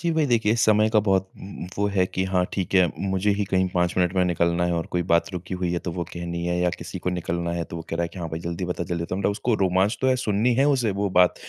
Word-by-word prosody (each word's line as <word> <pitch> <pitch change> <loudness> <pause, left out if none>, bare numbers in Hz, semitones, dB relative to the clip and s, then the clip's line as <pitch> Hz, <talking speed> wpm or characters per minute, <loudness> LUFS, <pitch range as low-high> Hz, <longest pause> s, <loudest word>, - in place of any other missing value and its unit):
जी 170 0 0
भई 160 -1 +2
देखिए 115 -4 +2
समय 110 -1 +4
का 110 - +4
बहुत 95 -2 +1
उम - - -10
उम, - - -5
वो 100 - +2
है 95 - +4
कि 95 +1 -2
हाँ 90 -1 +1
ठीक 95 0 -2
है, 90 -1 +6 0.2
मुझे 95 +2 +1
ही 100 0 -1
कहीं 95 -1 +1
5 90 -1 0
मिनट 90 0 +2
में 90 -1 +3
निकलना 85 0 +1
है 85 - 0
और 85 -1 -1
कोई 90 - 0
बात 85 +1 +1
रुकी 90 +1 -5
हुई 90 -1 -2
है 85 - 0
तो 85 - -5
वो 85 0 -3
कहनी 85 0 -4
है 90 0 0
या 90 0 +2
किसी 85 +1 -7
को 90 - -2
निकलना 85 -1 -2
है 85 -1 -2
तो - - -5
वो 80 - -5
कह 85 - -3
रहा 85 - 0
है 85 - -1
कि 90 - -11
हाँ 85 - -4
भाई 80 +1 -5
जल्दी 85 +1 -4
बता 90 -1 -3
जल्दी। 85 +3 -1
उसको 110 +3 0
रोमांच 95 +2 +2
तो 130 - +1
है 130 - +4
सुननी 115 0 +1
है 135 +3 +3
उसे 125 -6 +2
वो 100 +1 -1
बात, 90 -1 +4
90 Hz, 300 wpm, -24 LUFS, 85-100 Hz, 0.2 s, है